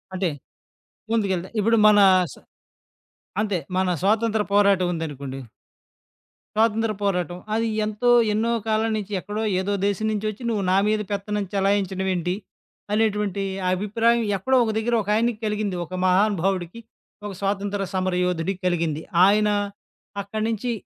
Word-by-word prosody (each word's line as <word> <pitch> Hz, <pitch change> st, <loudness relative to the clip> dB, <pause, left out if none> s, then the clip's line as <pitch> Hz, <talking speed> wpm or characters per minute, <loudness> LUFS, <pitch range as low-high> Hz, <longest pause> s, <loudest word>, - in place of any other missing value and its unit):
అంటె. 185 Hz, -2 st, 0 dB, 0.8 s
ముందుకెళ్తే. 190 Hz, -5 st, 0 dB
ఇప్పుడు 230 Hz, +2 st, +3 dB
మన 210 Hz, -1 st, +6 dB, 0.3 s
స -, -, -13 dB, 1.1 s
అంతే 205 Hz, -4 st, 0 dB, 0.2 s
మన 185 Hz, 0 st, +1 dB
స్వాతంత్ర 220 Hz, +1 st, +2 dB
పోరాటముందనుకోండి. 170 Hz, -9 st, +1 dB, 1.2 s
స్వాతంత్ర 225 Hz, 0 st, +2 dB
పోరాటం. 180 Hz, -3 st, -1 dB, 0.2 s
అది 225 Hz, +1 st, +1 dB, 0.2 s
ఎంతో 215 Hz, +3 st, 0 dB, 0.2 s
ఎన్నో 225 Hz, +2 st, +1 dB, 0.2 s
కాలం 220 Hz, +1 st, +1 dB
నుంచి 210 Hz, -1 st, -6 dB
ఎక్కడో 210 Hz, +4 st, -4 dB, 0.2 s
ఏదో 200 Hz, +2 st, -1 dB
దేశం 205 Hz, +2 st, -1 dB
నుంచొచ్చి 215 Hz, +1 st, -3 dB
నువ్వు 210 Hz, -3 st, -1 dB
నా 190 Hz, -, +4 dB
మీద 215 Hz, 0 st, +1 dB
పెత్తనం 205 Hz, +1 st, -2 dB
చలాయించడమేంటి? 190 Hz, -2 st, 0 dB, 0.6 s
అనేటువంటి 210 Hz, -2 st, 0 dB, 0.3 s
అభిప్రాయం 225 Hz, +5 st, +1 dB
ఎక్కడో 260 Hz, +8 st, +1 dB
ఒక 220 Hz, -, 0 dB
దగ్గర 235 Hz, +2 st, -1 dB
ఒకాయనకి 215 Hz, +2 st, +1 dB
కలిగింది 210 Hz, -2 st, -1 dB
ఒక 185 Hz, -, -12 dB
మహానుభవుడికి. 190 Hz, 0 st, +1 dB, 0.5 s
ఒక 205 Hz, -, -4 dB
స్వాతంత్ర 200 Hz, 0 st, -1 dB
సమర 185 Hz, -1 st, 0 dB
యోధుడికి 180 Hz, +2 st, -2 dB
కలిగింది. 165 Hz, -3 st, -1 dB, 0.2 s
ఆయన 210 Hz, +1 st, +4 dB, 0.7 s
అక్కడి 215 Hz, +2 st, -4 dB
నుంచి 230 Hz, +2 st, -2 dB
205 Hz, 120 wpm, -23 LUFS, 185-215 Hz, 1.2 s, మన